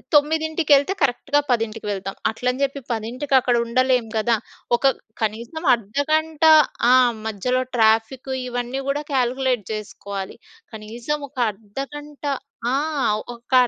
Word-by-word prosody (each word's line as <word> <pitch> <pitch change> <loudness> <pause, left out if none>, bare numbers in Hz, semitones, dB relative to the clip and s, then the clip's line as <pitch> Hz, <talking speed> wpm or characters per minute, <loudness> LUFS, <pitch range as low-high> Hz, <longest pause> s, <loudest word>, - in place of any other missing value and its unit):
తొమ్మిదింటికెళ్తే 315 +1 +3
కరెక్ట్‌గా 285 +2 +2
10:00కి 225 -2 -1
వెళ్తాం. 195 0 -4 0.2
అట్లని 250 +4 -2
చెప్పి 275 0 -2
10:00కి 250 +6 -2
అక్కడ 245 -1 +1
ఉండలేం 250 0 +2
కదా! 230 +1 +2 0.4
ఒక 270 0 +3 0.3
కనీసం 230 +9 -3
అర్ధగంట 290 +8 -1 0.5
ఆ! - - +7 0.3
మధ్యలో 250 +5 0
ట్రాఫికు 225 +4 +2
ఇవన్నీ 245 +2 -3
కూడా 290 +2 -1
కాలిక్యులేట్ 255 -3 +1
జేసుకోవాలి. 200 -2 -6 0.4
కనీసం 230 +7 -4
ఒక 275 - -28
అర్ధగంట 275 +9 -9 0.5
ఆ! - - +3 0.6
ఒక 235 +2 -11
250 Hz, 110 wpm, -22 LUFS, 225-285 Hz, 0.6 s, ఆ